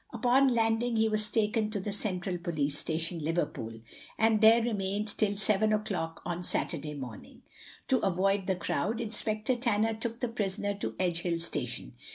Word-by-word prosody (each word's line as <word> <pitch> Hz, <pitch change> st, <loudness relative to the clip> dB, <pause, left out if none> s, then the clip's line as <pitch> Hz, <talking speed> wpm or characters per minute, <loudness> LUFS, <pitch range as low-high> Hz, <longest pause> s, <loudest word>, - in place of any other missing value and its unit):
Upon 260 Hz, +2 st, +3 dB
landing 230 Hz, -1 st, +1 dB
he 220 Hz, 0 st, +3 dB
was 215 Hz, 0 st, +1 dB
taken 215 Hz, -1 st, +1 dB
to 210 Hz, -1 st, -2 dB
the 200 Hz, +2 st, -4 dB
central 185 Hz, -3 st, -2 dB
police 155 Hz, -5 st, -1 dB
station, 165 Hz, +3 st, -1 dB
Liverpool, 115 Hz, -9 st, -2 dB, 0.4 s
and 220 Hz, -1 st, +3 dB
there 225 Hz, +1 st, +7 dB
remained 205 Hz, -2 st, -2 dB
till 205 Hz, -2 st, +1 dB
seven 210 Hz, +1 st, +3 dB
o'clock 195 Hz, -6 st, -2 dB
on 175 Hz, 0 st, -3 dB
Saturday 155 Hz, -4 st, -1 dB
morning. 125 Hz, -6 st, -9 dB, 0.5 s
To 260 Hz, -, +4 dB
avoid 195 Hz, 0 st, +1 dB
the 190 Hz, -, +2 dB
crowd 180 Hz, +5 st, -1 dB
Inspector 215 Hz, +1 st, -1 dB
Tanner 225 Hz, -2 st, +1 dB
took 230 Hz, +1 st, -4 dB
the 245 Hz, -, -1 dB
prisoner 205 Hz, -3 st, -1 dB
to 200 Hz, -, -4 dB
Edgehill 175 Hz, -1 st, 0 dB
station. 165 Hz, -, -2 dB
205 Hz, 160 wpm, -30 LUFS, 175-225 Hz, 0.5 s, there